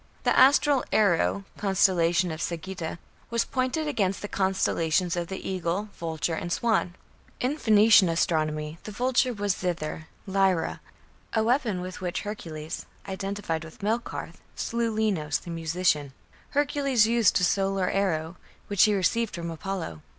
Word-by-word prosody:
The -, -, +2 dB
astral 275 Hz, +1 st, +5 dB
"Arrow" 200 Hz, -1 st, +2 dB, 0.2 s
(constellation 180 Hz, -3 st, +2 dB
of 160 Hz, +1 st, -5 dB
Sagitta) 170 Hz, -1 st, -4 dB, 0.3 s
was 235 Hz, 0 st, +1 dB
pointed 260 Hz, +4 st, -1 dB
against 200 Hz, -10 st, -1 dB
the -, -, -2 dB
constellations 185 Hz, -3 st, +1 dB
of 175 Hz, -1 st, -2 dB
the 190 Hz, +1 st, -6 dB
"Eagle", 185 Hz, +2 st, -2 dB
"Vulture", 160 Hz, -1 st, -2 dB
and 175 Hz, 0 st, -4 dB
"Swan". 220 Hz, -4 st, +1 dB, 0.4 s
In 260 Hz, +4 st, 0 dB
Phoenician 215 Hz, -, +6 dB
astronomy 155 Hz, -2 st, 0 dB
the 215 Hz, -, -6 dB
Vulture 250 Hz, +3 st, +1 dB
was 205 Hz, -4 st, 0 dB
"Zither" 160 Hz, -3 st, -3 dB, 0.2 s
(Lyra), 190 Hz, -3 st, +1 dB, 0.5 s
a 220 Hz, -, +2 dB
weapon 230 Hz, -5 st, +1 dB
with 185 Hz, 0 st, -7 dB
which 180 Hz, -2 st, -2 dB
Hercules 165 Hz, -6 st, -6 dB, 0.2 s
(identified 195 Hz, -4 st, -3 dB
with 160 Hz, +5 st, -12 dB
Melkarth) 225 Hz, +3 st, -3 dB
slew 235 Hz, 0 st, -1 dB
Linos, 190 Hz, -9 st, 0 dB
the 170 Hz, -, -8 dB
musician. 160 Hz, -4 st, 0 dB, 0.4 s
Hercules 275 Hz, -5 st, +2 dB
used 230 Hz, -1 st, +3 dB
a -, -, -1 dB
solar 195 Hz, 0 st, +1 dB
arrow, 175 Hz, -3 st, -1 dB, 0.3 s
which 200 Hz, -2 st, +5 dB
he 210 Hz, -1 st, +2 dB
received 220 Hz, +4 st, 0 dB
from 170 Hz, -1 st, -4 dB
Apollo. 165 Hz, -, -5 dB
190 Hz, 140 wpm, -27 LUFS, 170-220 Hz, 0.5 s, Phoenician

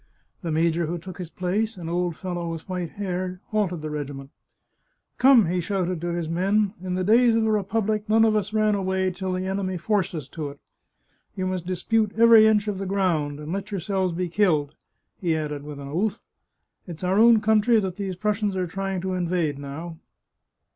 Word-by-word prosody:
The 170 Hz, -4 st, -3 dB
major 165 Hz, +1 st, +1 dB
who 175 Hz, +2 st, -2 dB
took 180 Hz, +2 st, -10 dB
his 175 Hz, -3 st, -5 dB
place, 195 Hz, +5 st, -2 dB
an 170 Hz, -2 st, -7 dB
old 175 Hz, 0 st, -1 dB
fellow 175 Hz, -2 st, -4 dB
with 165 Hz, -1 st, -6 dB
white 180 Hz, -3 st, -4 dB
hair, 185 Hz, -2 st, -3 dB
halted 185 Hz, -7 st, -1 dB
the 155 Hz, -, -4 dB
regiment. 140 Hz, -2 st, -6 dB, 0.5 s
" -, -, -49 dB
Come," 255 Hz, -5 st, +7 dB
he 180 Hz, +2 st, 0 dB
shouted 180 Hz, -2 st, -2 dB
to 175 Hz, -, -3 dB
his 170 Hz, -1 st, -2 dB
men, 195 Hz, +5 st, +1 dB
" -, -, -24 dB
in 180 Hz, -1 st, -2 dB
the 185 Hz, -, -1 dB
days 230 Hz, +4 st, +5 dB
of 225 Hz, -, +2 dB
the 220 Hz, -, +2 dB
Republic 210 Hz, +1 st, 0 dB
none 225 Hz, +1 st, +5 dB
of 220 Hz, -1 st, +3 dB
us 210 Hz, 0 st, -1 dB
ran 215 Hz, -1 st, +2 dB
away 190 Hz, -1 st, 0 dB
till 185 Hz, +1 st, -4 dB
the 185 Hz, 0 st, -2 dB
enemy 190 Hz, -1 st, -2 dB
forced 195 Hz, 0 st, 0 dB
us 150 Hz, -5 st, -5 dB
to 155 Hz, -3 st, -5 dB
it. 140 Hz, -, -12 dB, 0.8 s
You 185 Hz, -, -2 dB
must 185 Hz, -2 st, -3 dB
dispute 210 Hz, +3 st, 0 dB
every 230 Hz, -1 st, +8 dB
inch 215 Hz, -1 st, +3 dB
of 200 Hz, -2 st, -2 dB
the 195 Hz, -, -3 dB
ground, 165 Hz, -7 st, 0 dB
and 150 Hz, +3 st, -5 dB
let 200 Hz, +2 st, -4 dB
yourselves 190 Hz, -1 st, -1 dB
be 180 Hz, +1 st, -2 dB
killed! 165 Hz, -6 st, +1 dB, 0.2 s
" -, -, -52 dB
he 165 Hz, -4 st, +1 dB
added 150 Hz, -2 st, -3 dB
with 145 Hz, 0 st, -8 dB
an 140 Hz, -, -7 dB
oath. 190 Hz, +8 st, -1 dB, 0.3 s
" -, -, -49 dB
It's 170 Hz, 0 st, -8 dB
our 185 Hz, +3 st, +2 dB
own 230 Hz, 0 st, +7 dB
country 220 Hz, +2 st, +4 dB
that 190 Hz, -3 st, -3 dB
these 195 Hz, -2 st, -3 dB
Prussians 210 Hz, +1 st, -1 dB
are 185 Hz, -1 st, 0 dB
trying 195 Hz, +1 st, -3 dB
to 190 Hz, 0 st, -2 dB
invade 170 Hz, -5 st, -1 dB
now." 160 Hz, +4 st, -7 dB
185 Hz, 210 wpm, -24 LUFS, 170-205 Hz, 0.8 s, every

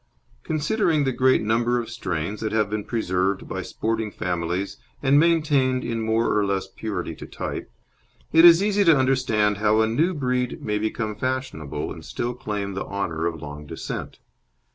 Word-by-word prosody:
Considering 155 Hz, 0 st, +1 dB
the 135 Hz, -, +1 dB
great 130 Hz, -1 st, +3 dB
number 120 Hz, +3 st, +1 dB
of 115 Hz, -, -4 dB
strains 100 Hz, -3 st, -3 dB
that 110 Hz, -1 st, -2 dB
have 105 Hz, -2 st, +1 dB
been 105 Hz, -1 st, -2 dB
preserved 95 Hz, -4 st, -1 dB
by -, -, -4 dB
sporting 110 Hz, -1 st, -2 dB
families 90 Hz, 0 st, -3 dB, 0.3 s
and 140 Hz, +2 st, +5 dB
maintained 150 Hz, -6 st, +2 dB
in 115 Hz, -1 st, -2 dB
more 110 Hz, +1 st, +1 dB
or 105 Hz, -, +3 dB
less 100 Hz, -1 st, -1 dB
purity 105 Hz, +2 st, -4 dB
to -, -, -10 dB
type, -, -, -5 dB, 0.6 s
it 165 Hz, +1 st, +7 dB
is 175 Hz, +2 st, +9 dB
easy 205 Hz, 0 st, +3 dB
to 165 Hz, -5 st, +6 dB
understand 125 Hz, -6 st, +2 dB
how 105 Hz, +1 st, +3 dB
a 110 Hz, -, +4 dB
"new" 155 Hz, +12 st, +1 dB
breed 125 Hz, -3 st, -1 dB
may 105 Hz, -1 st, -2 dB
become 110 Hz, 0 st, -2 dB
fashionable, 130 Hz, -, -3 dB
and -, -, -11 dB
still 120 Hz, +1 st, -3 dB
claim 105 Hz, -4 st, -4 dB
the 95 Hz, -, -3 dB
honour 85 Hz, -5 st, -2 dB
of 80 Hz, -3 st, -5 dB
long 75 Hz, 0 st, -8 dB
descent. -, -, -6 dB
110 Hz, 170 wpm, -24 LUFS, 100-130 Hz, 0.6 s, is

